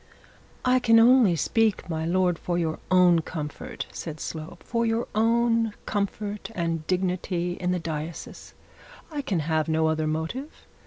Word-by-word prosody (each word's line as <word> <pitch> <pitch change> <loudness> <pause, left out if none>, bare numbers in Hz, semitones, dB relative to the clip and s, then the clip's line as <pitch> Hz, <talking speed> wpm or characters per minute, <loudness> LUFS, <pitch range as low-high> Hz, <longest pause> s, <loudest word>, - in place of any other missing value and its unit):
'I 255 0 +4
only 230 -4 +6
speak, 220 +6 +1
my 160 -2 -2
lord, 180 -1 +2
for 175 -1 -2
your 160 -2 -1
own 180 -2 +5
comfort,' 150 -3 -6
said 160 -2 -6
Slope; 160 +1 -7
'for 235 -1 -1
your 230 +1 0
own 230 0 +2
comfort 205 0 -3
and 165 -2 -2
dignity 180 -1 -1
in 180 0 -3
the 180 - +1
diocese. 160 -1 -6 0.6
I 295 -2 -2
can 195 - -1
have 155 +1 0
no 160 0 +2
other 155 0 0
motive. 160 - -4
180 Hz, 145 wpm, -26 LUFS, 160-225 Hz, 0.6 s, only